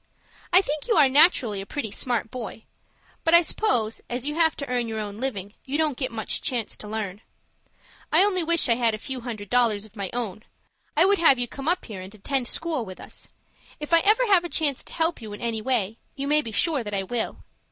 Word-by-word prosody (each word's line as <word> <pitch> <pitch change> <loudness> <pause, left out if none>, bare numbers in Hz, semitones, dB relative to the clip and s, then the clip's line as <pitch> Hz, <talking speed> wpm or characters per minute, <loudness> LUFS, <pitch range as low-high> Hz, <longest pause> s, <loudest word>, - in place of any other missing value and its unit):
I 365 +2 +6
think 300 +1 -3
you 460 - +3
are 275 - +7
naturally 260 - +4
a - - -8
pretty 230 -5 -4
smart 230 0 -1
boy; 235 -3 -7 0.6
but 330 +1 +5
I 340 - +7
suppose, 240 - 0
as 245 +1 -3
you 295 - -1
have 320 0 +3
to 280 - -4
earn 245 -2 -1
your 220 -1 -4
own 205 0 -5
living, 205 -7 -3
you 275 +2 -2
don't 310 -3 +1
get 260 -1 -3
much 220 -2 -2
chance 240 -4 -1
to 210 - -9
learn. 210 -2 -4 0.9
I - - +6
only 375 -4 +2
wish 335 -1 +3
I 235 - +4
had 230 -2 +1
a - - -7
few 260 +3 -5
hundred 220 -5 -7
dollars 230 -4 +3
of 215 - -18
my 200 -3 -4
own. 220 -4 -4 0.6
I 325 - +6
would 400 +1 +3
have 320 -6 +6
you 245 0 -1
come 275 +4 -8
up 360 +2 +1
here, 205 -5 -7
and 190 +3 -10
attend 250 +4 -1
school 320 -4 -1
with 185 -3 -9
us. - - -8 0.5
If 300 +2 -5
I 335 - +8
ever 430 +8 +4
have 390 -6 +4
a 345 - -5
chance 290 -6 +1
to - - -11
help 325 -3 0
you 215 -2 -7
in 205 - -8
any 230 -2 -2
way, 225 -3 0 0.2
you 275 0 -4
may 300 +1 +3
be 230 - -7
sure 270 +6 +1
that 205 -2 -4
I 195 - 0
will. 225 +3 -3
245 Hz, 235 wpm, -25 LUFS, 220-310 Hz, 0.9 s, I